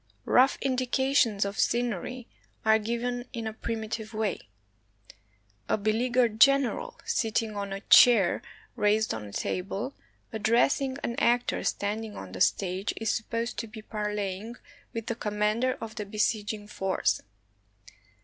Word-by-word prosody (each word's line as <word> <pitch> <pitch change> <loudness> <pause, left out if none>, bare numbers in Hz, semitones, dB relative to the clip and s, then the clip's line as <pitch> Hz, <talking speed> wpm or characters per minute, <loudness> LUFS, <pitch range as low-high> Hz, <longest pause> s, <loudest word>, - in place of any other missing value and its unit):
Rough 260 +2 +4
indications 255 -4 +2
of 200 +2 -4
scenery 240 +1 -1 0.4
are 220 0 +5
given 240 +2 -2
in 230 -2 -4
a 220 - -3
primitive 220 0 -4
way. 210 - -2 1.2
A - - +2
beleaguered 225 +2 +1
general, 275 -2 +4
sitting 225 -1 0
on 200 -1 -4
a 195 0 -4
chair 210 -4 +6 0.3
raised 215 +1 +2
on 110 -1 -5
a 100 - -10
table, 195 - -3 0.4
addressing 245 +5 +2
an 235 - -1
actor 240 +1 +2
standing 210 +1 -2
on 95 - -8
the 95 - -7
stage, 190 +1 +1
is 225 0 0
supposed 230 +1 -3
to 230 - -4
be 215 0 -10
parleying 210 +1 -3 0.4
with 230 -1 -5
the 230 - -1
com 210 -2 -4
mander 220 +5 +2
of 225 -1 -6
the 210 - -5
besieging 210 0 -1
force. 190 - 0
220 Hz, 135 wpm, -28 LUFS, 205-240 Hz, 1.2 s, chair